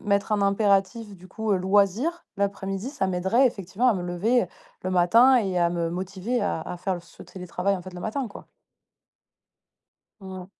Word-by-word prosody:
mettre 200 +1 0
un 210 - +2
impératif, 200 +1 +1
du 180 +1 -15
coup, 220 +3 -4
heu, 195 - +3
loisir, 205 - +1
l'après-midi, 200 +3 -2
ça 195 -10 -1
m'aiderait, 190 +8 +2
effectivement, 200 +4 -1
à 235 - +4
me 180 - -3
lever 190 +6 +1 0.4
le 185 - -2
matin 230 +9 +5
et 190 -6 0
à 170 0 +3
me 170 -1 -2
motiver 190 +7 -3
à 160 - -1
à 180 - -6
faire 180 0 -3
ce 170 - -15
télétravail, 180 +1 -2
en 180 - -6
fait, 185 0 -10
le 180 - -8
matin, 240 +6 -3
quoi. 200 - -12 1.7
Mmh. 185 -1 -8
195 Hz, 175 wpm, -25 LUFS, 180-220 Hz, 1.7 s, matin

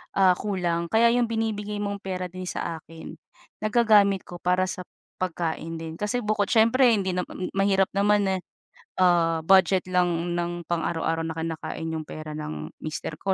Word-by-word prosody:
ah, 190 -2 +6
kulang 175 -4 -1
kaya 230 +5 +4
'yong 245 -1 +2
binibigay 210 -2 -2
mong 200 0 -3
pera 185 -2 -4
din 185 0 -7
sa 165 -2 -3
akin 160 +1 -11 0.5
nagagamit 215 -4 +4
ko 175 - -8
para 180 +1 +2
sa 180 0 -5 0.4
pagkain 165 -2 -3
din 160 0 -6
kasi 220 +4 -1
bukod 210 -1 0
siyempre 235 +3 +5
hindi 190 -2 -1
nam 180 - 0 0.3
mahirap 195 -1 +3
naman 205 +1 +3
na, 190 - +1 0.7
ah, 170 -2 +3
budget 190 0 +5
lang 175 -1 +1
ng 175 0 -2
pang-araw-araw 165 -1 -1
na 160 - -3
kinakain 160 0 -4
'yong 160 -1 -4
pera 155 0 -7
ng 75 - -5
mister 155 0 -5
ko, 190 +4 0
185 Hz, 160 wpm, -25 LUFS, 165-205 Hz, 0.7 s, ah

